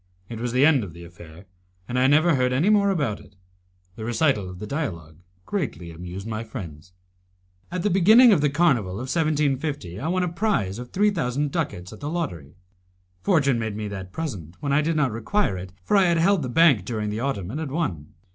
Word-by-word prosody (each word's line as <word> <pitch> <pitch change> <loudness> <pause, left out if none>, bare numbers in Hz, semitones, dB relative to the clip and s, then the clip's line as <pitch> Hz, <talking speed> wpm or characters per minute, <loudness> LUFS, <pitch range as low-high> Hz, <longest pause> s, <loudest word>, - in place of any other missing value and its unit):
It 115 -2 -6
was 120 +1 -2
the 130 +3 +4
end 145 -6 +4
of 90 -5 -8
the 85 +1 -11
affair, 85 0 -13 0.4
and 125 +1 -1
I 130 - +4
never 155 +5 +4
heard 125 -2 +1
any 145 +10 +2
more 205 -1 +4
about 140 - -1
it. 100 - -18 0.6
The 110 - -7
recital 115 - +1
of 90 - -9
the 105 - -6
dialogue 85 - -5 0.3
greatly 90 - -4
amused 90 +4 -8
my 110 0 -4
friends. 90 - -9 0.8
At 180 -1 -3
the 210 - +1
beginning 215 +6 +7
of 160 - +2
the 145 - +3
Carnival 135 - +2
of 130 +7 -4
1750 145 - -1
I 140 - -3
won 180 +2 +1
a - - 0
prize 165 - -1
of 125 0 -8
three 205 +2 +2
thousand 145 -4 -1
ducats 95 - -3
at - - -12
the 145 - -4
lottery. 90 - -4 0.7
Fortune 140 - +2
made 110 -2 -3
me 105 0 -4
that 95 -2 -7
present 95 - -6
when 140 -1 -1
I 145 - +4
did 165 +2 0
not 145 -5 +1
require 115 - 0
it, 90 0 -7
for 210 - +1
I 195 -2 +5
had 170 -1 +2
held 190 +2 +3
the 130 - -3
bank 145 - +4
during 105 0 -3
the 105 - -3
autumn, 105 -8 -3
and 145 - -4
had 160 -3 -4
won. 115 - -3
130 Hz, 215 wpm, -24 LUFS, 100-160 Hz, 0.8 s, beginning